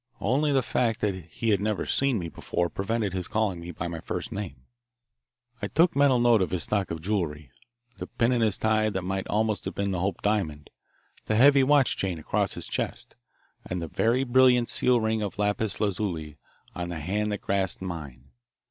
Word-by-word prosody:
Only 145 +4 +1
the 135 -2 +2
fact 115 -2 0
that 105 -2 +1
he 110 +8 -3
had 100 -2 +2
never 105 -1 -1
seen 135 -3 +1
me 85 -4 -3
before 85 +1 -2
prevented 105 0 -2
his 90 -2 -3
calling 105 -5 0
me 85 +1 -8
by 85 0 -4
my 85 -1 -5
first 90 +4 -5
name. 100 -8 -5 1.1
I 100 - -1
took 165 - +3
mental 140 -2 +4
note 120 -3 +4
of 95 - +1
his 90 -2 0
stock 100 -3 -1
of 80 -1 -5
jewellery, 80 - -2 0.5
the - - -5
pin 115 +1 +1
in 120 -2 +1
his 110 -3 +2
tie 110 0 +2
that 95 -3 -3
might 95 +1 -3
almost 110 0 0
have - - -4
been 100 0 -1
the 90 - -1
Hope 95 +2 -2
diamond, 80 -9 -1 0.6
the 110 - +1
heavy 140 +4 +6
watch 135 -1 +4
chain 95 -3 -2
across 75 - -1
his - - -6
chest, - - -4 0.5
and 90 -2 -4
a - - -4
very 120 +10 +1
brilliant 125 -1 +4
seal 125 -1 +3
ring 110 0 0
of 100 -3 -4
lapis 105 +1 0
lazuli 90 -8 -2 0.3
on 85 0 -4
the 85 -2 -4
hand 105 +7 -1
that 105 - -3
grasped 95 -1 -1
mine. 70 -7 -7
105 Hz, 200 wpm, -27 LUFS, 90-115 Hz, 1.1 s, heavy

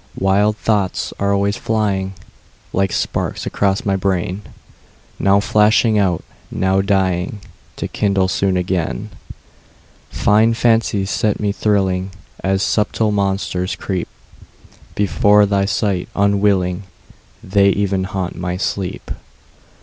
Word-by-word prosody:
Wild 100 +2 +2
thoughts 100 -5 -1
are 100 0 +1
always 100 +1 +1
flying, 100 -4 -1 0.6
Like 95 -1 +1
sparks - - -2
across 100 -1 0
my 100 -1 +1
brain, 95 0 -1 0.8
Now 100 0 +4
flashing 105 +1 +3
out, 90 -4 +1 0.3
now 95 +1 +1
dying, 95 0 0 0.4
To - - -4
kindle 100 -2 +1
soon 95 0 0
again. 95 +3 -2 1.0
Fine 110 +2 +3
fancies 115 -4 +1
set 105 -2 0
me 105 -1 0
thrilling, 95 -3 0 0.3
And 95 0 0
subtle 105 +1 +1
monsters 95 -2 -1 1.2
creepBefore 105 +1 +4
my 100 -1 +1
sight 95 -1 -1
unwilling:They 100 0 0
even 95 -1 0
haunt 95 -1 -4
my 90 0 -3
sleep. 95 -1 -3
100 Hz, 105 wpm, -18 LUFS, 95-105 Hz, 1.2 s, Now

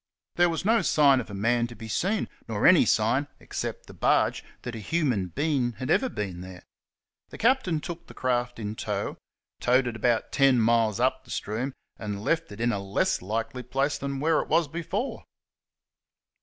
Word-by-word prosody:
There 175 0 +4
was 165 +2 -3
no 225 +1 +4
sign 145 -6 +4
of 115 - -6
a 100 - -6
man 120 +4 +1
to 120 - -11
be 110 - -9
seen, 195 - 0 0.2
nor 105 -2 -1
any 180 -2 +7
sign, 120 +6 +2
except - - -5
the - - -12
barge, - - +2 0.2
that 125 - -5
a 115 - -5
humau 115 - 0
being 140 -5 +1
had 130 +3 -4
ever 260 - +3
been 95 - -4
there. 90 0 -10 0.7
The - - -10
captain 230 - +2
took 170 +2 -7
the - - -13
craft 120 -1 -1
in 105 -2 -4
tow, - - -3 0.4
towed 125 +1 +3
it 120 -2 -3
about 115 +1 +1
ten 135 -3 +4
miles 115 -1 +2
up 130 +1 +1
the 125 - -21
stream, 120 +6 -3 0.3
and 105 -2 -4
left 165 0 0
it 100 - -10
in 120 +1 +2
a 105 - -1
less 100 0 0
likely 115 +5 -3
place 135 +4 -1
than 140 0 -3
where 160 +2 +2
it - - -7
was 165 -2 +3
before. 170 - -4
125 Hz, 190 wpm, -27 LUFS, 110-150 Hz, 0.7 s, any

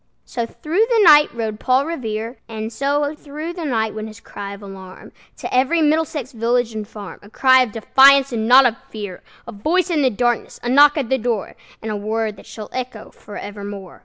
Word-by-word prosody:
So 235 -2 -4
through 330 - -1
the 455 -3 +3
night 300 -4 +7
rode 220 -2 -4
Paul 260 +2 +2
Revere; 230 -6 -4
And 220 0 -6
so 285 +3 0
through 305 +2 -7
the 345 -2 -6
night 220 -6 -1
went 215 0 -6
his 215 0 -12
cry 200 -2 -8
of 200 - -14
alarm 190 -1 -11 0.3
To - - -6
every 265 +7 +2
Middlesex 300 -3 0
village 235 0 0
and 215 -1 -5
farm, 205 -3 -10
A 205 - -16
cry 260 +3 +4
of 250 -4 -1
defiance 270 +5 +5
and 225 -2 -2
not 260 +2 +7
of 235 -2 +2
fear, 205 -4 -7 0.3
A - - -6
voice 340 - 0
in 310 -3 +1
the 265 - +3
darkness, 240 +1 -2
a 240 - -2
knock 290 +3 +6
at 270 -6 -2
the 265 - +1
door, 230 -3 -3 0.3
And 220 - -4
a - - -2
word 215 +1 -2
that - - -15
shall 215 -2 -9
echo 255 -4 -6
forevermore! 205 -2 -9
240 Hz, 205 wpm, -20 LUFS, 215-280 Hz, 0.3 s, night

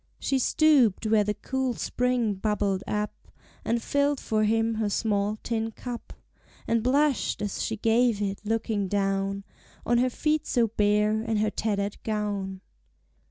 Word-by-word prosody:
She 270 - 0
stooped 260 -7 +3
where 215 -1 +4
the 210 0 -1
cool 265 -2 -2
spring 250 -3 0
bubbled 200 -1 -1
up, 210 0 -1 0.5
And 235 0 -1
filled 285 0 +1
for 215 -1 0
him 225 +1 +2
her 210 - +1
small 205 0 0
tin 225 -1 -1
cup, 240 +1 -7 0.5
And 230 0 +2
blushed 275 +1 +1
as 205 -2 -3
she 225 - -2
gave 225 0 +2
it, 200 -1 -2
looking 215 -2 -1
down 195 0 -1 0.4
On 240 0 +3
her 255 +1 +3
feet 305 +4 0
so 235 -3 +2
bare, 210 0 +2
and 225 -1 -1
her 210 0 +1
tattered 205 -2 -2
gown. 205 -3 -3
220 Hz, 150 wpm, -27 LUFS, 205-240 Hz, 0.5 s, where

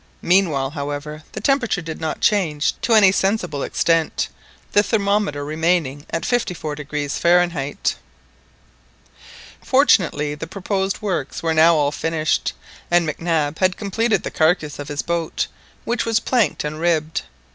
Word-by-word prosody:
Meanwhile, 165 -8 +2
however, 145 +1 -5
the 215 - -5
temperature 250 -5 +1
did 160 0 -7
not 160 -1 -3
change 160 -8 +2
to 230 - +3
any 200 -3 +7
sensible 190 -7 0
extent, 165 +1 +1 0.4
the 205 - +5
thermometer 200 -8 0
remaining 155 -2 0
at 165 - -3
54° 150 - -2
Fahrenheit. 170 -5 +1 1.7
Fortunately 175 - +3
the 150 +2 -6
proposed 195 +2 -2
works 170 -10 -3
were 165 -1 +1
now 165 +1 +6
all 145 -2 +2
finished, 160 +1 -1 0.4
and 175 -1 +3
MacNab 155 -1 -1
had 185 -1 +2
completed 220 +3 0
the - - -4
carcass 155 -2 +1
of 145 - -6
his 145 -1 -3
boat, 170 -2 -1 0.4
which 235 +1 0
was 225 -1 +1
planked 240 -3 +1
and 150 +1 -4
ribbed. 160 -2 0
165 Hz, 135 wpm, -21 LUFS, 150-195 Hz, 1.7 s, any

